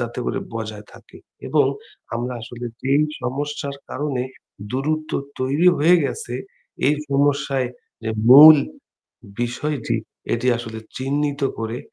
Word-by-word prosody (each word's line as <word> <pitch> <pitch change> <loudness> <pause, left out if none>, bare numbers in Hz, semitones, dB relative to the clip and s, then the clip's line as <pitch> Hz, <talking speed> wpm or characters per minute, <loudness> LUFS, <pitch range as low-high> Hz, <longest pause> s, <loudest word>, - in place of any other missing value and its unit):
যাতে 120 +1 -4
করে - - -1 0.2
বজায় 110 -2 -6
থাকে - - -16 0.3
এবং - - +3 0.5
আমরা 120 +2 -3
আসলে 120 +1 -7 0.2
যেই 140 +3 +3 0.2
সমস্যার 140 +2 -3
কারণে 135 -2 -2 0.5
দূরত্ব 155 +4 -2 0.3
তৈরি 145 +7 +3
হয়ে 170 +4 +6
গেছে 120 -2 -4 0.5
এই 145 - +4 0.2
সমস্যায় 140 -2 +1 0.4
যে 110 - -1 0.2
মূল 150 +4 +11 0.8
বিষয়টি 120 0 -2 0.4
এটি 120 +2 -3
আসলে 110 -2 -7 0.2
চিহ্নিত 145 +2 -1 0.2
করে, 115 +2 -3
135 Hz, 115 wpm, -22 LUFS, 120-145 Hz, 0.8 s, মূল